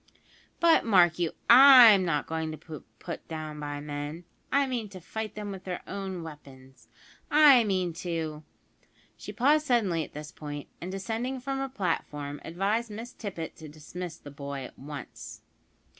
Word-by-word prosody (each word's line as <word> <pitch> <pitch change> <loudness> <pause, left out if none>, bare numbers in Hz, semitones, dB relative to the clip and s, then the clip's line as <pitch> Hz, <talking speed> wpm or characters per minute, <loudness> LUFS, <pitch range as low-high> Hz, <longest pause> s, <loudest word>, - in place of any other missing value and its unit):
"But, 335 -1 +5
mark 180 -6 +4
you, 170 -2 0
I'm 245 -6 +9
not 150 -4 0
going 160 0 -3
to 155 - -7
be 155 0 -10
put 170 - -7
down 155 -2 -6
by 145 -1 -5
men. 145 +3 -6 0.3
I 280 0 +3
mean 240 -5 -3
to 190 -2 -10
fight 215 +5 -6
'em 205 -1 -5
with 190 -1 -8
their 180 -2 -5
own 190 -3 -5
weapons. 135 -4 -13 0.4
I 290 -5 +7
mean 185 -4 0
to 160 -3 -4 0.4
" - - -34
She - - -7
paused 295 +4 +2
suddenly 200 -10 +2
at - - -12
this 150 +2 -8
point, 145 -3 -8
and, 180 +2 -5
descending 225 +7 -3
from 270 +1 -3
her 270 0 -2
platform, 150 - -3
advised 205 +7 -1
Miss 225 +3 -8
Tippet 180 -7 -6
to 155 -1 -10
dismiss 165 +3 -8
the 145 - -12
boy 140 -1 -6
at - - -13
once. 145 +1 -9
180 Hz, 170 wpm, -28 LUFS, 150-225 Hz, 0.4 s, I'm